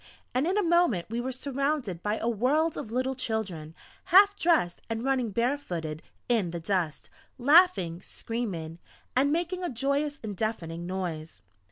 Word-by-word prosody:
And 260 +5 +1
in 380 +3 +1
a 420 - +3
moment 330 - +2
we 235 +1 -1
were 260 +2 -3
surrounded 275 - -2
by 210 +3 -1
a 225 - -2
world 275 +8 +2
of 220 - -6
little 255 +2 0
children, 195 -11 -3 0.3
half 400 +3 +6
dressed, 325 - +2
and 225 0 -2
running 260 -3 +1
bare 240 +7 0
footed 160 - -5 0.3
in 225 -7 +2
the 170 0 -4
dust, 170 -3 -2 0.3
laughing, 260 - +4
screaming, 180 -9 -5 0.4
and 275 +3 +3
making 350 +3 -1
a 350 - -1
joyous 280 +4 -1
and 210 -2 -4
deafening 175 -5 -3
noise. 175 -4 -5
235 Hz, 160 wpm, -28 LUFS, 180-285 Hz, 0.4 s, half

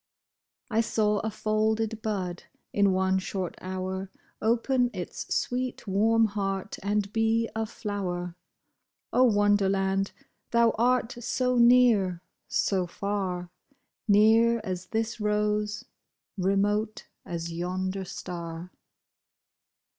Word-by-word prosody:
I 225 +1 +3
saw 210 -2 +1
a 220 - -2
folded 215 +1 0
bud, 190 -5 -3 0.3
in 200 -1 +4
one 190 0 +2
short 190 -1 -3
hour. 185 +1 -4 0.3
Open 245 +2 +2
its 180 - -6
sweet, 250 0 -1
warm 225 +3 +3
heart 195 -2 -3
and 205 0 -1
be 225 +1 +2
a 225 0 -1
flower. 180 -6 -4 0.8
O 255 - +5
Wonderland! 195 -3 +2 0.4
thou 235 -1 +4
art 245 0 +2
so 250 +1 +1
near, 235 -8 +5 0.2
so 185 -3 +1
far; 185 -2 -3 0.6
Near 225 +3 +5
as 185 -3 -4
this 225 +1 -2
rose, 210 0 0 0.5
remote 205 +3 0 0.2
as 170 -1 -5
yonder 185 +3 -2
star 170 -1 -7
205 Hz, 100 wpm, -27 LUFS, 190-225 Hz, 0.8 s, O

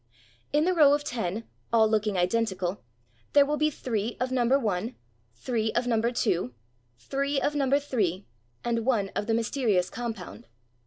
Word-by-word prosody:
In 300 +2 +3
the 370 - +3
row 290 -4 +6
of 290 - -3
ten, 225 -5 -3 0.2
all 225 -1 +5
looking 215 -2 0
identical, 185 -1 0 0.5
there 285 -1 +7
will 295 +1 0
be 305 +1 +3
three 230 -5 -3
of 255 +1 -1
number 255 +1 +3
one, 220 -1 -2 0.4
three 220 - -1
of 240 - +1
mmiber 235 -1 +1
two, 170 - 0 0.4
three 275 - -1
of 295 - 0
number 280 -1 +2
three, 210 -10 -1 0.4
and 230 -1 0
one 220 -6 +1
of 205 - -3
the 225 - +2
mysterious 225 -6 +1
compound. 225 - -6
230 Hz, 160 wpm, -27 LUFS, 205-270 Hz, 0.5 s, there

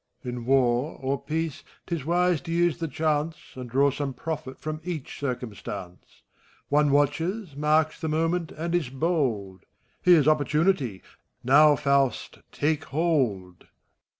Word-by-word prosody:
In 125 -2 -5
War 130 +1 +2
or 135 +1 -2
Peace, 160 -2 -3 0.2
't 175 - -5
is 155 -5 -3
wise 175 -1 +2
to 165 - -7
use 175 0 +1
the 165 - -2
chance, 155 +2 0 0.2
And 125 -2 -8
draw 140 +3 +3
some 140 -1 -4
profit 155 -1 -5
from 155 0 -5
each 165 -6 -6
eircuiostance. 105 -8 -6 0.5
One 145 0 +3
watches, 155 +5 0
marks 155 +2 +1
the 160 - -2
moment, 165 +2 0
and 170 +2 -4
is 170 -7 0
bold: 130 - -1 0.4
Here's 170 -5 +5
opportunity 150 - +1 0.4
I^now, 145 +3 +6
Faust, 140 -4 0
take 150 0 -1
hold! 130 - 0
FAUST. - - -25
150 Hz, 140 wpm, -26 LUFS, 130-160 Hz, 0.5 s, I^now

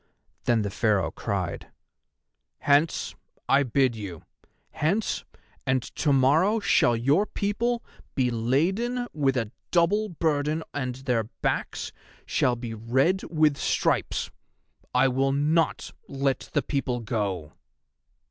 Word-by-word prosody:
Then 115 -3 +3
the 100 - -3
Pharaoh 105 -4 +1
cried: - - -3 0.9
"Hence! 145 +3 +2 0.3
I 135 - +5
bid 130 -1 +2
you. 95 -7 -7 0.5
Hence, 195 +9 0 0.4
and 130 -1 +1
to 150 - +2
morrow 155 +11 +4
shall 150 - +3
your 145 - +2
people 235 +4 -1 0.3
be 125 -3 +2
laden 185 - 0
with 135 -3 +1
a 115 -3 -2 0.2
double 200 +5 +2
burden 155 -2 0
and 130 -3 -2
their 125 -4 -1 0.2
backs - - -1 0.3
shall 125 - +1
be 120 -1 -6
red 130 - +1
with 155 -3 +2
stripes. - - 0 0.6
I - - +4
will 135 +1 +1
not 155 +3 +1 0.2
let 135 -1 -1
the - - +2
people 130 -4 -2
go!" 100 -9 -3
135 Hz, 120 wpm, -26 LUFS, 120-165 Hz, 0.9 s, I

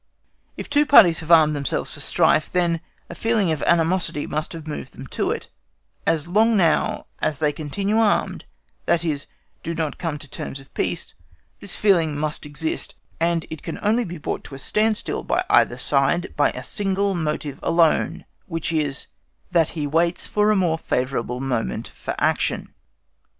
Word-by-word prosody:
If - - -6
two 290 +1 +2
parties 195 - +7
have 160 -1 -9
armed 155 -3 +6
themselves 140 -1 -2
for - - -10
strife, 155 - +2
then 170 -2 +1 0.3
a - - -8
feeling 220 -6 +1
of 155 - -2
animosity 170 -2 +2
must 155 +1 -3
have 165 -2 -8
moved 150 -4 -6
them 135 - -9
to - - -2
it; - - -3 0.6
as 160 -1 +1
long 220 +5 +3
now 170 -4 +2
as 150 - 0
they 150 +1 +1
continue 195 +9 -1
armed, 220 -2 +1 0.4
that 170 0 +2
is, 145 -3 -2 0.3
do 165 - -4
not 160 -4 -3
come 165 -4 -2
to 145 -1 -11
terms 135 - -6
of 135 - -17
peace, - - -2 0.5
this 200 - -5
feeling 170 -8 +2
must 150 0 -3
exist; 155 +2 -2 0.2
and 165 0 +1
it 160 - -6
can 165 - -5
only 220 +4 +2
be 175 -4 -6
brought 150 - -4
to 135 - -9
a - - -7
standstill 215 +9 0
by - - 0
either 120 - +4
side 140 +7 +1
by 145 - +3
one 130 - -7
single 195 +5 0
motive 150 -4 -3
alone, 165 -1 +2 0.2
which 165 -1 -3
is, 145 -3 -1 0.5
THAT 165 -3 +3
HE 150 - -1
WAITS 170 +4 +1
FOR 210 0 +2
A 215 - +4
MORE 170 -4 +1
FAVOURABLE 125 -2 -2
MOMENT 120 - -2
FOR - - -6
ACTION. - - 0
165 Hz, 175 wpm, -23 LUFS, 150-185 Hz, 0.6 s, parties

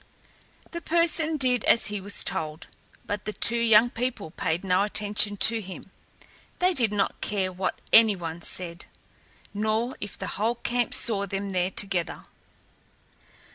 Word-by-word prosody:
The 340 - -5
person 325 -1 +1
did 250 -4 +1
as 230 - +4
he 210 0 -3
was 200 +2 -1
told, 155 0 -3 0.4
but 205 -1 -4
the 215 - -3
two 235 +2 +2
young 230 +1 +5
people 235 -9 -4
paid 165 +3 -2
no 185 0 +2
attention 205 0 0
to 225 +3 +4
him. 190 -2 -10 0.7
They 365 +1 +2
did 235 - +2
not 205 -1 -1
care 190 -3 -1
what 185 0 -3
any 220 -2 +7
one 170 -1 -6
said, 170 0 -6 0.7
nor 220 +4 -1
if 205 - -6
the - - -5 0.2
whole 230 +2 +1
camp 240 0 0
saw 200 -4 +2
them 195 +1 -4
there 180 -1 0
together. 190 -3 -2
210 Hz, 150 wpm, -26 LUFS, 190-235 Hz, 0.7 s, any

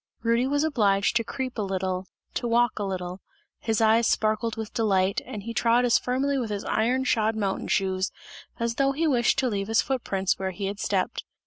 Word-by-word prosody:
Rudy 235 +2 +2
was 285 +2 +1
obliged 205 -10 +2
to 230 - 0
creep 255 +1 -5
a - - +1
little, 190 -1 -2 0.3
to 240 - -2
walk 235 -1 +2
a - - -1
little, 185 -1 -4 0.4
his 225 -1 0
eyes 225 +1 +4
sparkled 220 +1 +1
with 220 -1 -6
delight, 195 -4 +1
and 205 -2 -6
he 230 +2 -5
trod 235 +2 +3
as 235 - +4
firmly 270 +2 0
with 235 -3 -3
his 205 -1 -3
iron 250 +4 +1
shod 220 -3 +1
mountain 200 -3 -2
shoes, 190 0 0 0.5
as 230 0 0
though 275 0 +2
he 320 +4 0
wished 250 -6 +2
to 265 -1 +2
leave 200 -4 -2
his 225 0 +3
foot 265 -3 -2
prints 190 -1 0
where 190 0 -1
he 195 +2 -5
had 200 +1 -4
stepped. - - -1
225 Hz, 210 wpm, -26 LUFS, 195-245 Hz, 0.5 s, eyes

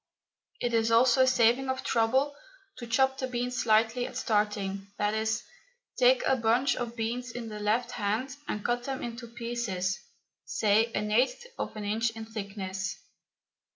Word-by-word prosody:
It 240 -1 -1
is 225 0 +3
also 240 +3 +5
a 260 - +5
saving 250 +1 +3
of 260 0 -2
trouble 260 +5 +2 0.5
to 240 - -7
chop 265 +3 +2
the 260 - -1
beans 250 0 -2
slightly 225 +2 +3
at - - -7
starting, 205 -2 0
i.e., 215 +1 0 0.7
take 255 0 +4
a 265 - +4
bunch 245 +3 +2
of 240 -1 -4
beans 240 +2 -2
in 230 -1 -6
the 210 -1 -6
left 225 +4 0
hand 240 +4 -2
and 210 -6 -4
cut 240 0 0
them 270 -1 -3
into 235 0 -6
pieces, 230 -6 -2 0.4
say 220 +2 +2
an 210 +1 -1
eighth 265 - +2
of - - -3
an 210 -1 -5
inch 220 +3 +1
in 225 0 -6
thickness. 195 -3 -4
230 Hz, 160 wpm, -29 LUFS, 215-250 Hz, 0.7 s, also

